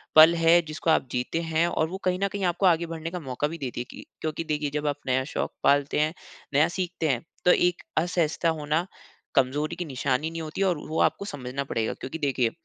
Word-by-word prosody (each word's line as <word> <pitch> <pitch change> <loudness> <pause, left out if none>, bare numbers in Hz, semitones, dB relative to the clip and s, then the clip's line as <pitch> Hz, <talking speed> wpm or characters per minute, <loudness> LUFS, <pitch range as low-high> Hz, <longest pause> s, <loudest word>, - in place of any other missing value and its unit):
पल 160 +2 +10
है, 165 +1 +5
जिसको 155 0 -4
आप 160 - +3
जीते 125 +6 -1
हैं 165 0 +1
और 160 -2 0
वो 190 - -4
कहीं 185 0 +1
न - - +4
कहीं 200 0 -3
आपको 180 +2 +1
आगे 170 -2 +4
बढ़ने 165 0 -5
का 180 - -4
मौका 135 -1 -2
भी 165 +2 -6
दे 135 -5 -3
देगी। 120 - -7 0.2
क्योंकि 155 +1 -2
देखिए, 150 -2 -1
जब 150 +1 -2
आप 145 - 0
नया 130 0 +2
शौक़ - - -1
पालते 145 +1 +3
हैं, 155 +1 +2 0.4
नया 150 +3 +5
सीखते 175 -2 -2
हैं, 125 -4 0 0.2
तो 180 - +7
एक 175 -1 +2 0.2
असहजता 170 -1 +1
होना 155 +1 0 0.5
कमज़ोरी 145 +5 +1
की 175 0 -4
निशानी 135 +1 -1
नहीं 165 0 -5
होती 155 +4 -5
और 180 -4 +2
वो 160 - -1
आपको 200 - +1
समझना 140 -5 -4
पड़ेगा। 115 -5 -1
क्योंकि 135 +5 -5
देखिए, 130 -5 +1
155 Hz, 220 wpm, -26 LUFS, 140-170 Hz, 0.5 s, पल